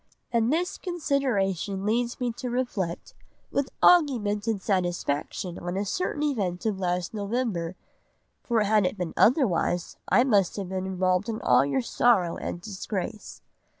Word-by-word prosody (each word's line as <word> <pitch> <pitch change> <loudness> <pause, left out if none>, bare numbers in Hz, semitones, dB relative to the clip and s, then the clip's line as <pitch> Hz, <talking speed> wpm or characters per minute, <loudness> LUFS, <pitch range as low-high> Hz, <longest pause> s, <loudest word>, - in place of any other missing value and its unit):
And 235 0 +2
this 350 +4 -1
consideration 225 - -1
leads 235 +3 0
me 245 -2 0
to 250 - -4
reflect, 230 -9 -3 0.4
with 280 -1 0
augmented 225 - +4
satisfaction 175 -2 -1
on 175 +2 -4
a 200 - -1
certain 300 - -2
event 200 -12 -1
of 210 -3 0
last 180 0 -1
November, 200 -5 -2 0.7
for 230 -3 +1
had 210 0 +3
it 205 - -4
been 180 -3 -3
otherwise 205 - +2
I 245 - +5
must 205 -8 +2
have 195 -3 -4
been 190 0 -3
involved 185 +2 0
in 220 -1 -3
all - - +5
your 145 - 0
sorrow 210 -8 +2
and - - -5
disgrace. 200 +1 -5
205 Hz, 145 wpm, -26 LUFS, 185-245 Hz, 0.7 s, I